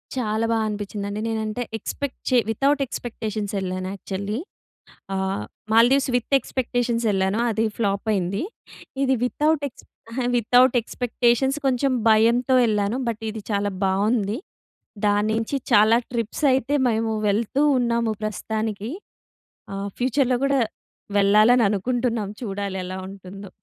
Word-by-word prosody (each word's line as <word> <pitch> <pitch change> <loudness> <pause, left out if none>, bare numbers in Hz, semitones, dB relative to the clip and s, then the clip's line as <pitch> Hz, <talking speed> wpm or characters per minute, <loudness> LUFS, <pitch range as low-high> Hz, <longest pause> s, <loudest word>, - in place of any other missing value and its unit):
చాలా 220 -3 0
బా 230 - +2
అనిపించిందండి. 205 0 -4
నేనంటే 220 +1 -2
ఎక్స్‌పెక్ట్ 275 +5 -5
చే 255 - +4
వితౌట్ 275 +6 +2
ఎక్స్‌పెక్టేషన్స్ 220 -4 -4
ఎళ్ళాను 185 0 -3
యాక్చువల్లీ. 200 +2 -4 0.8
ఆహ్, 190 - -1 0.3
మాల్దీవ్స్ 245 +5 +5
విత్ 245 +3 -1
ఎక్స్‌పెక్టేషన్స్ 245 -3 -1
ఎళ్ళాను. 190 +2 +1
అది 220 0 0
ఫ్లాప్ 200 -3 -1
అయింది. 195 +2 -1 0.6
ఇది 265 -1 +3
వితౌట్ 300 +3 +1
ఎక్స్ 245 - -18 0.5
వితౌట్ 245 +2 +4
ఎక్స్‌పెక్టేషన్స్ 245 +3 +1
కొంచెం 265 +1 +2 0.2
భయంతో 230 +4 +4
వెళ్ళాను. 210 0 +1
బట్ 225 -1 -3
ఇది 215 0 -7
చాలా 205 0 0
బావుంది. 205 +3 +1 0.7
దాన్నించి 215 +5 +1 0.2
చాలా 215 +2 +6 0.2
ట్రిప్స్ 230 +4 -2
అయితే 265 +2 +1
మేము 225 -1 0 0.2
వెళ్తూ 220 +6 0 0.2
ఉన్నాము 235 -2 +1
ప్రస్తుతానికి. 215 +1 -3 0.9
ఆహ్, 200 +1 -3
ఫ్యూచర్‌లో 255 0 +2
కూడా 275 -1 +2 0.6
వెళ్ళాలని 215 +4 +5
అనుకుంటున్నాం. 230 +1 -1
చూడాలి 200 -2 -3
ఎలా 185 +1 -5
ఉంటుందో! 195 0 -10
220 Hz, 115 wpm, -23 LUFS, 205-245 Hz, 0.9 s, చాలా